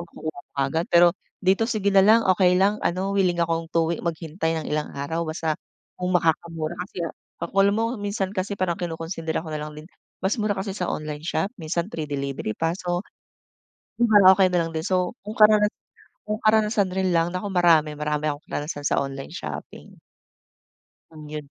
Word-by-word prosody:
makukuha 160 Hz, -3 st, -7 dB
mo -, -, -53 dB
agad. 140 Hz, +5 st, 0 dB
Pero 175 Hz, 0 st, +6 dB, 0.3 s
dito, 195 Hz, +5 st, +3 dB
sige 205 Hz, -4 st, 0 dB
na 195 Hz, -, +7 dB
lang 220 Hz, +4 st, +5 dB
okey 180 Hz, -1 st, +4 dB
lang, 200 Hz, +3 st, +2 dB
ano 190 Hz, +3 st, -1 dB
willing 185 Hz, -3 st, +2 dB
akong 165 Hz, -1 st, 0 dB
to 165 Hz, 0 st, +1 dB
wai -, -, -4 dB
maghintay 165 Hz, 0 st, -2 dB
ng -, -, -5 dB
ilang 150 Hz, 0 st, -1 dB
araw. 160 Hz, +4 st, -2 dB
Basta 160 Hz, 0 st, -1 dB, 0.5 s
kung 180 Hz, 0 st, -1 dB
makakamura 165 Hz, -1 st, -1 dB, 0.2 s
kasi 175 Hz, -, -4 dB
ak 165 Hz, -, -4 dB, 0.3 s
ako, -, -, -6 dB
alam 200 Hz, +1 st, +3 dB
mo 225 Hz, -, +1 dB, 0.2 s
minsan 200 Hz, -1 st, -2 dB
kasi 200 Hz, +1 st, -3 dB
parang 180 Hz, -2 st, +1 dB
kinukonsidera 165 Hz, -1 st, -3 dB
ko -, -, -6 dB
nalang 150 Hz, 0 st, -4 dB
din, 155 Hz, -, -11 dB, 0.3 s
mas 190 Hz, +2 st, 0 dB
mura 205 Hz, -2 st, 0 dB
kasi 195 Hz, 0 st, -3 dB
sa 180 Hz, -3 st, -2 dB
online 150 Hz, -1 st, -4 dB
shop, 175 Hz, +3 st, 0 dB
minsan 170 Hz, -3 st, -2 dB
free 165 Hz, -6 st, -5 dB
delivery 140 Hz, -4 st, -3 dB
pa, 165 Hz, +9 st, -1 dB
so 175 Hz, -1 st, -2 dB, 1.0 s
kumbaga 205 Hz, -5 st, +6 dB
okey 190 Hz, -2 st, +5 dB
na 175 Hz, -, +3 dB
lang -, -, -8 dB
din. 160 Hz, -, -2 dB
So 185 Hz, +4 st, 0 dB
kung 210 Hz, -, -5 dB
karana 210 Hz, -1 st, +6 dB, 0.6 s
kung 215 Hz, +1 st, -3 dB
karanasan 215 Hz, -2 st, +3 dB
rin 185 Hz, -1 st, 0 dB
lang, 165 Hz, +1 st, +2 dB
naku 185 Hz, +3 st, -4 dB
marami-marami 150 Hz, -3 st, +2 dB
akong 145 Hz, +1 st, -7 dB
karanasan 145 Hz, 0 st, -4 dB
sa -, -, +2 dB
online 135 Hz, 0 st, -5 dB
shopping. -, -, -8 dB, 1.2 s
Kung 155 Hz, -1 st, -11 dB
yun 150 Hz, 0 st, -6 dB
175 Hz, 185 wpm, -24 LUFS, 160-195 Hz, 1.2 s, na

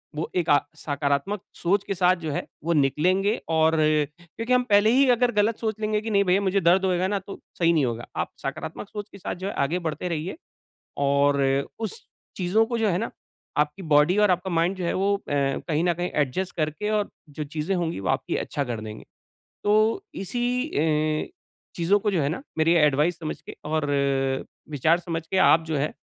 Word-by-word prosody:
वो 155 Hz, -, -3 dB
एक 175 Hz, -3 st, 0 dB
अ, 145 Hz, -, +6 dB, 0.2 s
सकारात्मक 145 Hz, +7 st, -1 dB
सोच 195 Hz, +3 st, +1 dB
के -, -, 0 dB
साथ 180 Hz, 0 st, +4 dB
जो 155 Hz, -, -1 dB
है, -, -, -3 dB, 0.2 s
वो 170 Hz, +1 st, +1 dB
निकलेंगे 180 Hz, -, +2 dB
और, 160 Hz, 0 st, +3 dB
क्योंकि 155 Hz, -, 0 dB
हम 250 Hz, 0 st, +4 dB
पहले 205 Hz, +1 st, +5 dB
ही 270 Hz, +3 st, +5 dB
अगर 245 Hz, 0 st, +3 dB
गलत 210 Hz, 0 st, +1 dB
सोच 220 Hz, -2 st, -2 dB
लेंगे 215 Hz, 0 st, 0 dB
कि 225 Hz, -, -5 dB
नहीं 200 Hz, -1 st, +4 dB
भैया 185 Hz, +1 st, +2 dB
मुझे 195 Hz, 0 st, +1 dB
दर्द 180 Hz, +3 st, +4 dB
होएगा 185 Hz, 0 st, +1 dB
ना, 200 Hz, +1 st, 0 dB
तो 195 Hz, +1 st, -10 dB, 0.2 s
सही 170 Hz, 0 st, +4 dB
नहीं 150 Hz, -5 st, +3 dB
होगा। 120 Hz, 0 st, -4 dB
आप -, -, -2 dB
सकारात्मक 205 Hz, -, -5 dB
सोच 210 Hz, 0 st, -7 dB
के -, -, -11 dB
साथ 185 Hz, -, -4 dB
जो 195 Hz, -, -1 dB
है -, -, -3 dB
आगे 165 Hz, +6 st, 0 dB
बढ़ते 155 Hz, +3 st, -3 dB
रहिए 170 Hz, -, -3 dB, 0.7 s
और 140 Hz, 0 st, +3 dB
अ, 135 Hz, 0 st, +2 dB
उस 220 Hz, -4 st, -5 dB, 0.3 s
चीज़ों 195 Hz, +5 st, +2 dB
को 235 Hz, 0 st, -2 dB
जो 225 Hz, -1 st, +2 dB
है 180 Hz, -2 st, +1 dB
ना, 230 Hz, -, -3 dB, 0.5 s
आपकी 150 Hz, +5 st, 0 dB
बॉडी 150 Hz, +2 st, +4 dB
और 210 Hz, -1 st, +5 dB
आपका 180 Hz, +1 st, 0 dB
माइंड 170 Hz, +3 st, +1 dB
जो 185 Hz, -, -4 dB
है, -, -, 0 dB
वो 200 Hz, +2 st, +2 dB
अ, -, -, -13 dB
कहीं 145 Hz, +3 st, 0 dB
न 175 Hz, -, +3 dB
कहीं 175 Hz, +2 st, -3 dB
एडजस्ट 150 Hz, +6 st, -1 dB
करके 155 Hz, +6 st, -1 dB
और 210 Hz, -1 st, 0 dB, 0.2 s
जो 150 Hz, +1 st, -5 dB
चीज़ें 155 Hz, +5 st, -2 dB
होंगी 170 Hz, -, -2 dB
वो 95 Hz, -, -3 dB
आपकी -, -, 0 dB
अच्छा 140 Hz, -, -2 dB
कर 120 Hz, -4 st, -4 dB
देंगे। 110 Hz, 0 st, -8 dB, 0.6 s
तो 215 Hz, -, +3 dB
इसी 245 Hz, +6 st, -1 dB
अ, 155 Hz, -, 0 dB, 0.5 s
चीज़ों 180 Hz, +4 st, +2 dB
को 210 Hz, 0 st, 0 dB
जो 175 Hz, -6 st, +1 dB
है 140 Hz, -, +1 dB
ना, 165 Hz, -, -4 dB, 0.2 s
मेरी 160 Hz, +2 st, +4 dB
एडवाइस 150 Hz, +2 st, +3 dB
समझ 155 Hz, -2 st, -5 dB
के -, -, -11 dB
और 155 Hz, 0 st, -1 dB, 0.9 s
विचार 155 Hz, +4 st, +3 dB
समझ 165 Hz, -2 st, -4 dB
के 190 Hz, -, -2 dB
आप 165 Hz, -3 st, +6 dB
जो 160 Hz, -1 st, -2 dB
है, 145 Hz, +2 st, -1 dB
175 Hz, 210 wpm, -25 LUFS, 150-200 Hz, 0.9 s, अ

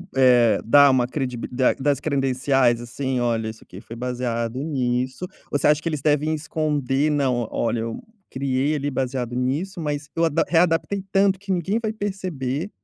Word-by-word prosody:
eh, 125 Hz, -3 st, +5 dB
dar 140 Hz, +5 st, +6 dB
uma 125 Hz, -2 st, +2 dB
credibili 125 Hz, -3 st, -4 dB, 0.3 s
das 140 Hz, +1 st, +1 dB
credenciais, 135 Hz, -3 st, +1 dB
assim. 130 Hz, +2 st, -3 dB
"Olha, 115 Hz, -2 st, 0 dB
isso 110 Hz, -, -11 dB
aqui -, -, -12 dB
foi 115 Hz, -, -10 dB
baseado 120 Hz, 0 st, -3 dB
nisso". 130 Hz, 0 st, -1 dB, 0.3 s
Ou -, -, +2 dB
você -, -, +2 dB
acha 150 Hz, 0 st, +3 dB
que 165 Hz, -, -2 dB
eles 155 Hz, -3 st, -3 dB
devem 150 Hz, +2 st, +1 dB
esconder? 150 Hz, -2 st, 0 dB
"Não, 130 Hz, -6 st, 0 dB
olha, 115 Hz, 0 st, -1 dB
eu 115 Hz, 0 st, -4 dB, 0.3 s
criei 135 Hz, +2 st, 0 dB
ali 145 Hz, 0 st, -2 dB
baseado 125 Hz, -2 st, -2 dB
nisso, 145 Hz, +10 st, -2 dB
mas 150 Hz, -1 st, -3 dB
eu 165 Hz, -, +2 dB
adap 160 Hz, 0 st, 0 dB
readaptei 175 Hz, +3 st, +2 dB
tanto 195 Hz, -1 st, +3 dB
que 200 Hz, 0 st, -5 dB
ninguém 190 Hz, +4 st, 0 dB
vai 220 Hz, -2 st, -2 dB
perceber". 185 Hz, -, -3 dB
135 Hz, 170 wpm, -23 LUFS, 125-155 Hz, 0.3 s, dar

